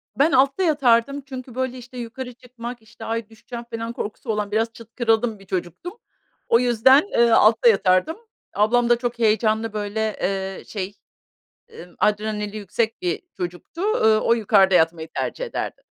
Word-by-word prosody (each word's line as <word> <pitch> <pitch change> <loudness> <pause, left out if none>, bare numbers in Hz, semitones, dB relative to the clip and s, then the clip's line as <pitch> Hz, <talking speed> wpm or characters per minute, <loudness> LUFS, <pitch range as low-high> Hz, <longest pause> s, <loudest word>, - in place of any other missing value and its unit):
Ben 295 +4 +3
altta 275 +8 +3
yatardım 275 -3 +2
çünkü, 255 -2 -9
böyle, 260 -1 -2
işte, 250 +1 -11
yukarı 245 +1 -6
çıkmak, 240 -1 -9
işte, 220 - -12
"ay, 225 -1 -3
düşeceğim." 235 +2 -9
falan 230 +1 -4
korkusu 220 +3 -6
olan 210 -1 -2
biraz 225 +2 0
çıtkırıldım 225 -1 -1
bir 195 - -16
çocuktum. 180 - -5 0.5
O 230 - +4
yüzden, 250 +3 +5
eee, 235 0 +4
altta 225 +2 +5
yatardım. 195 - +2 0.4
Ablam 235 +3 +2
da 240 - +6
çok 240 -1 -4
heyecanlı, 220 0 +1
böyle, 215 +1 -2
eee, 195 0 -2
şey, 200 -1 -5 0.9
ımm, 180 - -20
adrenali 210 0 -1
yüksek 220 - -2
bir 360 - -2
çocuktu, 180 - -6
ııı, 220 - +3
o - - +2
yukarıda 200 -4 +4
yatmayı 165 -1 +2
tercih - - -3
ederdi. - - -5
230 Hz, 155 wpm, -22 LUFS, 210-250 Hz, 0.9 s, da